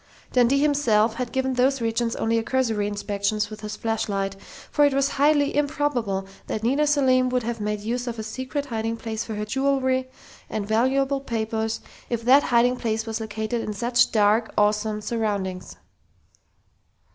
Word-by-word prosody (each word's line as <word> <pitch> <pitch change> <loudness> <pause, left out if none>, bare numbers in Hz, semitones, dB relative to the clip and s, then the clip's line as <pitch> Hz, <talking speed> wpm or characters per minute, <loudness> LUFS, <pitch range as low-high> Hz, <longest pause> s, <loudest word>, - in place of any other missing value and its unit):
Dundee 250 +2 +4
himself 245 -7 +3
had 250 -2 -3
given 265 0 0
those 260 +2 +2
regions 230 0 -1
only 230 +1 +1
a - - -1
cursory 225 -5 0
inspection 205 0 -2
with 215 - -8
his 210 0 -5
flashlight, 200 -3 -2 0.4
for 295 - +3
it 285 -2 +4
was 275 0 +2
highly 285 0 +2
improbable 285 -9 0 0.2
that 215 - -3
Nita 275 +6 +2
Selim 260 -3 +3
would 250 -1 0
have 230 -1 -3
made 210 0 -2
use 240 +3 -3
of 235 -1 -4
a 220 - -4
secret 260 +6 -4
hiding 225 -3 -3
place 225 -1 -4
for 220 - -6
her 210 0 -3
jewelry 260 +1 0 0.4
and 210 -2 -3
valuable 265 +5 +2
papers, 225 -2 -2 0.3
if 235 -1 -2
that 265 +4 +6
hiding 245 -1 +3
place 225 -2 -2
was 225 0 -4
located 220 +2 -3
in 215 - -4
such 240 +4 +2
dark, 215 +1 +3
awesome 210 +1 +1
surroundings. 205 -4 -3
230 Hz, 165 wpm, -24 LUFS, 215-260 Hz, 0.4 s, that